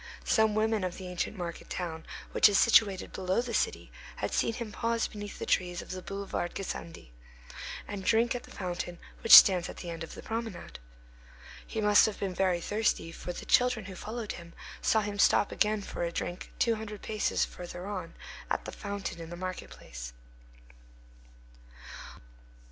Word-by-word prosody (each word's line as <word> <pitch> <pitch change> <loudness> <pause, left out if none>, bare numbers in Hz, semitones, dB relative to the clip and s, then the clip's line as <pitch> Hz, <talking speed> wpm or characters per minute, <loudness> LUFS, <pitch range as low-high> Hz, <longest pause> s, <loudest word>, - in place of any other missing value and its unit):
Some 220 -2 +3
women 220 -1 +1
of 180 -1 -3
the 185 - -7
ancient 180 +3 -3
market 170 -2 -6
town 160 -3 -4 0.2
which - - +6
is 200 - +3
situated 205 -5 +4
below 185 +2 0
the 240 -1 -2
city - - -1 0.2
had - - -3
seen 230 - +1
him 225 -2 -5
pause 230 +1 0
beneath 205 -1 -8
the - - -4
trees 180 -1 +1
of - - -8
the 185 0 -5
boulevard 195 -2 -4
Gassendi, 170 - -6 0.8
and 200 -2 -5
drink 230 +3 +3
at 245 - -4
the - - -15
fountain 175 -2 -4 0.2
which 230 - +10
stands 185 -4 +7
at - - -8
the 175 - -6
end 165 0 -5
of 165 - -8
the - - -9
promenade. 225 -5 -5 0.9
He 220 - -3
must 210 0 +6
have 215 - -4
been 195 -2 -2
very 180 -2 +1
thirsty: 205 -4 0
for 175 - -6
the - - -8
children 250 -4 +3
who 190 - -7
followed 220 +3 -5
him 170 -1 -10 0.3
saw 220 - +3
him 205 -1 -4
stop 200 - +4
again 210 -1 +1
for - - -6
a 170 - -1
drink, 175 +1 -4
two 235 - +3
hundred 210 -2 -7
paces 215 -1 0
further 175 0 -8
on, 185 -4 -5 0.3
at - - -1
the - - -5
fountain 200 -4 -5
in 165 - -8
the 175 - -6
market 185 0 -5
place. - - -9
195 Hz, 180 wpm, -30 LUFS, 175-215 Hz, 0.9 s, which